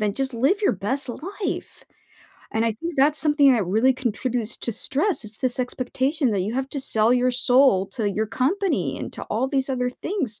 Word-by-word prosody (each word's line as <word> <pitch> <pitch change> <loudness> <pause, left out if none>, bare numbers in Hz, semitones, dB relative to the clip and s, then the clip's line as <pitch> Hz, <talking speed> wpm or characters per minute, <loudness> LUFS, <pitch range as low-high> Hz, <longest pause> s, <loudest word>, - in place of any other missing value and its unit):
then 210 -1 0
just 265 +3 -3
live 275 - +1
your 415 - +2
best 255 +8 -3
life, 380 - -6 0.7
and 225 +1 +1
I 225 - +1
think 335 +10 -6
that's 290 +3 +3
something 295 -2 +5
that 220 -7 0
really 220 +8 +3
contributes 245 -2 -2
to 235 - -3
stress, 310 - +2
it's 215 0 -5
this 255 -1 -1
expectation 260 +2 -1
that 200 - 0
you 200 +4 -2
have 265 +1 -2
to 280 - -2
sell 220 -3 +2
your 250 0 +2
soul 245 -5 +3
to 205 0 -2
your 215 +2 -2
company 335 - -1
and - - -6
to - - -8
all 240 +5 -1
these 270 -1 -1
other 250 -1 -1
things 270 - -4
255 Hz, 200 wpm, -23 LUFS, 220-280 Hz, 0.7 s, something